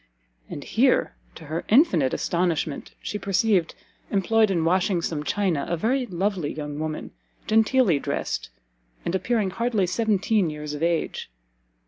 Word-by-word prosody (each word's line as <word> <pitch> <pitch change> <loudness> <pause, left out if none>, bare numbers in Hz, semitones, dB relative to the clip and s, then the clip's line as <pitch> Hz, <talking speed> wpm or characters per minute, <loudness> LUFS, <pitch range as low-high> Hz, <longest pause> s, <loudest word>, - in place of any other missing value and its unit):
And - - -6
here, - - +2 0.2
to - - -11
her 160 +3 -3
infinite 200 - +4
astonishment, 170 -4 -1
she 210 - -3
perceived, 195 -3 +1 0.3
employed 215 +2 +3
in 170 -4 +1
washing 185 +1 +2
some 150 -3 -2
china, 180 -4 0
a 170 - 0
very 250 +8 0
lovely 185 -4 -1
young 150 -1 -5
woman, 155 0 -4 0.3
[genteelly] 220 - +3
dressed, - - -3 0.6
and 170 - -1
appearing 205 0 0
hardly 230 -2 0
seventeen 205 -1 +1
years 150 -1 -6
of 150 - -6
age. 170 -1 -1
185 Hz, 135 wpm, -25 LUFS, 160-215 Hz, 0.6 s, infinite